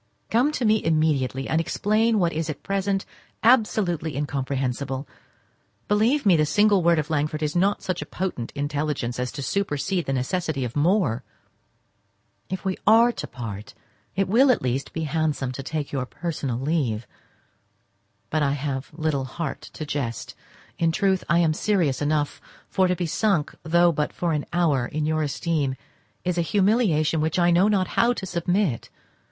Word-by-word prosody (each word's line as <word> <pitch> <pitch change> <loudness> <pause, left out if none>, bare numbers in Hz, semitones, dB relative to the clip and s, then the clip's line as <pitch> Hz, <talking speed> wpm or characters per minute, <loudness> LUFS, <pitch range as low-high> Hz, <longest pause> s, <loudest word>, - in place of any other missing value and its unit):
Come 245 +6 +3
to 250 - -1
me 215 0 +3
immediately, 150 -5 +1
and 160 +1 +1
explain 215 +6 +1
what 175 -4 +1
is 160 0 -2
at 150 - -6
present 195 0 -1 0.4
absolutely 195 - +2
incomprehensible. 135 -1 -2 0.8
Believe 225 +7 +2
me, 190 -4 +6
the 155 - +3
single 205 +5 +3
word 170 0 +4
of 155 +1 -2
Langford 155 0 -1
is 150 +1 -1
not 195 +3 +3
of - - -22
such 185 -2 -3
potent 175 -11 -3
intelligence 145 -4 -2
as 125 0 -2
to 140 - -5
supersede 185 +2 -1
the 135 - 0
necessity 140 +1 -1
of 120 - -6
more. 145 - +2 1.3
If 190 +1 -5
we 190 -1 -1
are 230 +3 +6
to - - -6
part, 110 -4 -7 0.4
it 195 0 +1
will 245 +8 +5
at 250 - +3
least 130 +2 -2
be 160 - -3
handsome 150 -4 -1
to 130 - -6
take 150 +1 -4
your 130 -3 -2
personal 150 -6 -3
leave—but 135 +2 -5
I 140 -1 +2
have 135 -1 -3
little 155 -4 -1
heart 140 +1 -5
to 155 - -5
jest; 140 -6 -4 0.5
in 165 -1 +3
truth, 190 +1 +1
I 170 - +4
am 165 -2 +3
serious 170 -8 +1
enough; 145 0 0 0.3
for 190 -1 +2
to 180 - +1
be 175 - -2
sunk, 170 -2 0
though 170 +1 +4
but 150 -2 -2
for 170 -2 -1
an 150 -1 -2
hour, 150 -8 +2
in 155 0 -2
your 155 0 +1
esteem 145 -1 -1 0.5
is 180 -1 0
a - - +4
humiliation 185 -5 +2
to - - +1
which 160 +2 0
I 175 -1 +4
know 180 +4 +4
not 195 -3 +1
how 240 +1 +3
to 200 - -5
submit. 175 - -1
160 Hz, 170 wpm, -24 LUFS, 140-190 Hz, 1.3 s, me